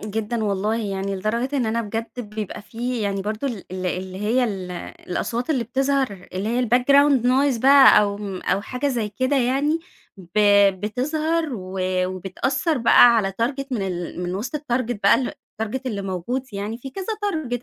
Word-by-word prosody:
جدًا 220 Hz, +2 st, -3 dB
والله 205 Hz, +2 st, 0 dB
يعني 195 Hz, 0 st, -3 dB
لدرجة 235 Hz, +8 st, -1 dB
إن 245 Hz, -4 st, +1 dB
أنا 230 Hz, +1 st, 0 dB
بجد 225 Hz, +3 st, -5 dB
بيبقى 210 Hz, -2 st, -6 dB
في 235 Hz, +3 st, -4 dB
يعني 200 Hz, -1 st, -1 dB
برضه 215 Hz, +6 st, -3 dB
ال 220 Hz, -6 st, -6 dB
ال 185 Hz, 0 st, -3 dB
اللي 185 Hz, +1 st, -4 dB
هي 235 Hz, +5 st, +2 dB
ال 190 Hz, -5 st, -4 dB, 0.4 s
الأصوات 240 Hz, -, -2 dB
اللي 255 Hz, -6 st, +1 dB
بتظهر 265 Hz, -6 st, -1 dB
اللي 195 Hz, +4 st, -2 dB
هي 245 Hz, +1 st, +1 dB
الbackground 275 Hz, +1 st, +4 dB
noise 255 Hz, -1 st, +2 dB
بقى 275 Hz, -4 st, +8 dB
أو 200 Hz, 0 st, -1 dB, 0.2 s
أو 190 Hz, +2 st, 0 dB
حاجة 260 Hz, +5 st, -2 dB
زي 230 Hz, -5 st, -1 dB
كده 255 Hz, +7 st, 0 dB
يعني 275 Hz, +5 st, +1 dB, 0.4 s
ب 185 Hz, +2 st, -5 dB, 0.4 s
بتظهر 305 Hz, +9 st, -1 dB
و 185 Hz, -1 st, -6 dB, 0.3 s
وبتأثر 255 Hz, -, -1 dB
بقى 235 Hz, 0 st, +7 dB
على 195 Hz, -3 st, +1 dB
target 275 Hz, +3 st, -1 dB
من 225 Hz, -6 st, -1 dB
ال 180 Hz, -1 st, -4 dB
من 180 Hz, +1 st, -3 dB
وسط 240 Hz, +10 st, -3 dB
الtarget 245 Hz, -5 st, -2 dB
بقى 200 Hz, +4 st, +6 dB
الtarget 245 Hz, -1 st, -5 dB
اللي 205 Hz, -5 st, -3 dB
موجود 195 Hz, +8 st, -3 dB
يعني 205 Hz, +4 st, -4 dB
في 270 Hz, +2 st, -8 dB
كذا 385 Hz, +4 st, -6 dB, 0.2 s
target 275 Hz, -, -2 dB
230 Hz, 170 wpm, -22 LUFS, 200-260 Hz, 0.4 s, بقى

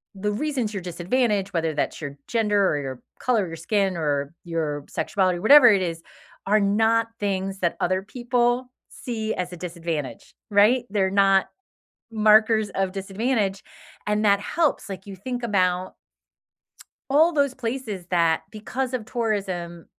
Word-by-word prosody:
the 210 Hz, +2 st, -2 dB
reasons 245 Hz, -2 st, -2 dB
you're 195 Hz, -, -4 dB
disadvantaged, 195 Hz, +3 st, -1 dB
whether 165 Hz, -2 st, 0 dB
that's 150 Hz, -, -2 dB
your 140 Hz, -1 st, -6 dB
gender 210 Hz, -4 st, +2 dB
or 145 Hz, -, 0 dB
your 130 Hz, -2 st, -6 dB, 0.2 s
color 235 Hz, -5 st, +1 dB
of 175 Hz, -, -5 dB
your 165 Hz, -, -6 dB
skin 190 Hz, +3 st, 0 dB
or 145 Hz, -2 st, -1 dB
your 155 Hz, -4 st, -3 dB
sexuality, 185 Hz, -3 st, 0 dB
whatever 275 Hz, +5 st, +8 dB
it 200 Hz, -4 st, +5 dB
is, 165 Hz, -2 st, -4 dB, 0.5 s
are 210 Hz, +2 st, +4 dB
not 225 Hz, +3 st, +2 dB
things 195 Hz, -1 st, -2 dB
that 170 Hz, -2 st, 0 dB
other 185 Hz, +1 st, 0 dB
people 245 Hz, +3 st, -1 dB, 0.2 s
see 220 Hz, -3 st, -4 dB
as 180 Hz, 0 st, -4 dB
a -, -, -8 dB
disadvantage, 165 Hz, -5 st, -5 dB, 0.2 s
right? 220 Hz, +5 st, +4 dB
They're 195 Hz, -2 st, +1 dB
not 195 Hz, -1 st, +4 dB, 0.6 s
markers 215 Hz, 0 st, +4 dB
of 195 Hz, -1 st, -1 dB
disadvantage, 200 Hz, +1 st, -1 dB, 0.4 s
and 210 Hz, +1 st, +1 dB
that 200 Hz, -1 st, +4 dB
helps. 310 Hz, +7 st, 0 dB
Like 190 Hz, -1 st, -7 dB
you 200 Hz, -1 st, -8 dB
think 245 Hz, +5 st, -5 dB
about 185 Hz, -4 st, 0 dB, 1.2 s
all 320 Hz, +5 st, +5 dB
those 280 Hz, -3 st, +1 dB
places 230 Hz, -7 st, -4 dB
that 165 Hz, -2 st, +2 dB
because 250 Hz, +4 st, -4 dB
of 245 Hz, -4 st, -3 dB
tourism 190 Hz, -8 st, -3 dB
200 Hz, 150 wpm, -24 LUFS, 180-230 Hz, 1.2 s, whatever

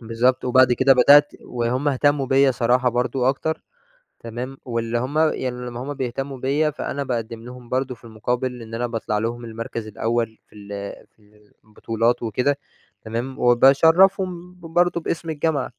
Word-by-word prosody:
بالضبط، 120 Hz, +2 st, +1 dB
وبَعد 130 Hz, 0 st, +5 dB
كده 130 Hz, +2 st, +5 dB
بدأت 145 Hz, +4 st, +6 dB
وهُم 125 Hz, +4 st, -1 dB
اهتمّوا 145 Hz, 0 st, +1 dB
بيَّ 135 Hz, 0 st, +4 dB
صراحة 125 Hz, +1 st, +2 dB
برضه 125 Hz, +1 st, 0 dB
أكتر، 160 Hz, +4 st, -1 dB, 0.6 s
تمام، 120 Hz, +4 st, -6 dB
واللي 115 Hz, -1 st, -2 dB
هُم 135 Hz, +5 st, -2 dB
يعني 155 Hz, -5 st, +1 dB, 0.2 s
لمّا 120 Hz, 0 st, -6 dB
هُم 145 Hz, +2 st, -5 dB
بيهتمّوا 135 Hz, +1 st, -4 dB
بيَّ 145 Hz, +4 st, +1 dB
فأنا 140 Hz, -1 st, -4 dB
باقدّم 115 Hz, -2 st, -4 dB
لهُم 125 Hz, -1 st, -11 dB
برضه 130 Hz, 0 st, -1 dB
في 115 Hz, -, -23 dB
المقابل 125 Hz, +2 st, -3 dB
إن 115 Hz, 0 st, -9 dB
أنا 120 Hz, +2 st, -1 dB
باطلَع 115 Hz, -3 st, -2 dB
لهم 120 Hz, +2 st, -3 dB
المَركَز 115 Hz, 0 st, -6 dB
الأول 115 Hz, +1 st, -2 dB
في -, -, -25 dB
ال 100 Hz, -1 st, -12 dB, 0.4 s
في -, -, -47 dB
ال 105 Hz, 0 st, -25 dB
البطولات 115 Hz, +2 st, -1 dB
وكده. 125 Hz, +5 st, 0 dB, 0.5 s
تمام؟ 120 Hz, +4 st, -4 dB
وباشرّفهم 175 Hz, +8 st, +4 dB
ب 180 Hz, -, -23 dB
برضه 175 Hz, +1 st, +1 dB
باسم 165 Hz, 0 st, -3 dB
الجامعة. 155 Hz, -3 st, -1 dB
125 Hz, 160 wpm, -22 LUFS, 115-140 Hz, 0.6 s, بدأت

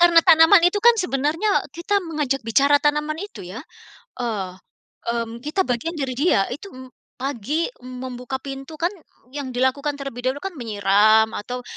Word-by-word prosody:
Karena 340 Hz, -1 st, +7 dB
tanaman 335 Hz, +1 st, +7 dB
itu 360 Hz, +4 st, +3 dB
kan 475 Hz, +2 st, +7 dB
sebenarnya 325 Hz, +2 st, 0 dB, 0.2 s
kita 400 Hz, +4 st, 0 dB
mengajak 300 Hz, -6 st, -2 dB
bicara 275 Hz, +6 st, +4 dB
tanaman 300 Hz, +1 st, 0 dB
itu 405 Hz, -, -8 dB
ya. 190 Hz, +8 st, -7 dB, 0.6 s
Eee, 205 Hz, -6 st, -3 dB, 0.6 s
mmm, 235 Hz, 0 st, -3 dB
kita 305 Hz, +8 st, -1 dB
bagian 250 Hz, +8 st, -2 dB
dari 270 Hz, -3 st, -2 dB
dia, 275 Hz, -, +3 dB
itu 320 Hz, +9 st, -9 dB
em 260 Hz, 0 st, -10 dB, 0.3 s
pagi 275 Hz, +4 st, -2 dB, 0.2 s
m 255 Hz, 0 st, -9 dB
membuka 250 Hz, 0 st, -5 dB
pintu 275 Hz, +2 st, -7 dB
kan 335 Hz, +3 st, -1 dB, 0.4 s
yang 285 Hz, -1 st, -5 dB
dilakukan 270 Hz, +3 st, 0 dB
terlebih 275 Hz, -3 st, -7 dB
dahulu 270 Hz, +3 st, -2 dB
kan 390 Hz, -, -3 dB
menyiram, 215 Hz, 0 st, +3 dB
atau 250 Hz, +4 st, -5 dB
275 Hz, 160 wpm, -22 LUFS, 245-325 Hz, 0.6 s, Karena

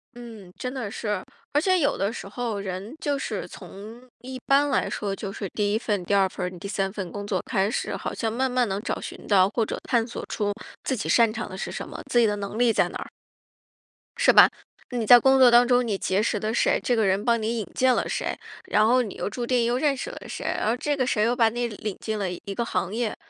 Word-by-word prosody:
嗯， 225 Hz, -6 st, -11 dB
真 250 Hz, -, -4 dB
的 245 Hz, -7 st, -4 dB
是。 210 Hz, -3 st, -3 dB, 0.3 s
而 295 Hz, -, +3 dB
且 370 Hz, +1 st, +3 dB
有 285 Hz, -, +1 dB
的 200 Hz, +2 st, 0 dB
时 -, -, -7 dB
候 220 Hz, 0 st, -3 dB
人 195 Hz, +6 st, -6 dB
就 290 Hz, -1 st, -1 dB
是 -, -, -4 dB
从 215 Hz, +5 st, -11 dB, 0.2 s
一 255 Hz, +1 st, -7 dB
般 280 Hz, +1 st, +4 dB
来 265 Hz, -, +1 dB
说， 200 Hz, -2 st, -3 dB
就 195 Hz, -1 st, -6 dB
是 195 Hz, -1 st, -5 dB
第 205 Hz, -1 st, 0 dB
1 -, -, +2 dB
份， 205 Hz, -5 st, -1 dB
第 200 Hz, -, -1 dB
2 195 Hz, -1 st, +4 dB
份 180 Hz, -, -4 dB
儿， 180 Hz, -1 st, -6 dB
第 200 Hz, -, -6 dB
3 195 Hz, -1 st, -1 dB
份 190 Hz, -4 st, -6 dB
工 205 Hz, 0 st, -6 dB
作 195 Hz, -3 st, -1 dB
开 195 Hz, -1 st, +1 dB
始， -, -, -2 dB
好 -, -, -4 dB
像 225 Hz, -2 st, -2 dB
慢 260 Hz, +4 st, 0 dB
慢 250 Hz, -1 st, +2 dB
能 195 Hz, +1 st, -2 dB
找 245 Hz, -, -3 dB
寻 -, -, -8 dB
到 190 Hz, -2 st, +5 dB
或 225 Hz, +1 st, 0 dB
者 -, -, -4 dB
探 235 Hz, -3 st, +1 dB
索 240 Hz, -, -7 dB
出 205 Hz, -2 st, -1 dB, 0.3 s
自 265 Hz, -, -1 dB
己 225 Hz, -, -4 dB
擅 230 Hz, -2 st, +5 dB
长 225 Hz, -, -5 dB
的 185 Hz, -, -8 dB
是 -, -, -4 dB
什 -, -, -6 dB
么， -, -, -8 dB
自 240 Hz, -, +3 dB
己 230 Hz, -, +5 dB
的 210 Hz, -, 0 dB
能 205 Hz, +1 st, -5 dB
力 245 Hz, -1 st, +4 dB
在 -, -, +2 dB
哪 -, -, -6 dB
儿。 -, -, -8 dB, 1.1 s
是 -, -, +5 dB
吧？ -, -, +8 dB, 0.4 s
你 240 Hz, -3 st, -1 dB
在 245 Hz, +2 st, +10 dB
工 265 Hz, +2 st, +4 dB
作 255 Hz, -2 st, +8 dB
当 240 Hz, +1 st, +6 dB
中 245 Hz, 0 st, +3 dB
你 210 Hz, -4 st, -1 dB
结 190 Hz, +1 st, 0 dB
识 215 Hz, -1 st, 0 dB
的 215 Hz, +2 st, -2 dB
谁， -, -, +2 dB
这 245 Hz, -, +2 dB
个 220 Hz, -2 st, +2 dB
人 195 Hz, +2 st, +1 dB
帮 235 Hz, -2 st, +2 dB
你 225 Hz, +2 st, -1 dB
引 215 Hz, -, -3 dB
荐 255 Hz, 0 st, +3 dB
了 -, -, -1 dB
谁， -, -, -2 dB, 0.3 s
然 215 Hz, -, +3 dB
后 250 Hz, +2 st, +4 dB
你 215 Hz, -6 st, -5 dB
又 -, -, -3 dB
注 240 Hz, +3 st, -4 dB
定 245 Hz, -1 st, +2 dB
又 240 Hz, +1 st, +1 dB
认 280 Hz, 0 st, +1 dB
识 385 Hz, -, -4 dB
了 -, -, -9 dB
谁， -, -, -6 dB
而 225 Hz, +3 st, 0 dB
这 290 Hz, +3 st, -1 dB
个 260 Hz, -2 st, 0 dB
谁 210 Hz, -5 st, +1 dB
又 235 Hz, +2 st, +2 dB
把 230 Hz, -3 st, +4 dB
你 240 Hz, +1 st, -2 dB
领 210 Hz, -2 st, -6 dB
进 220 Hz, -1 st, -3 dB
了 195 Hz, -2 st, -1 dB
一 190 Hz, +3 st, -6 dB
个 235 Hz, -, 0 dB
行 230 Hz, -, -2 dB
业， 230 Hz, -1 st, -1 dB
225 Hz, 275 characters per minute, -25 LUFS, 200-245 Hz, 1.1 s, 在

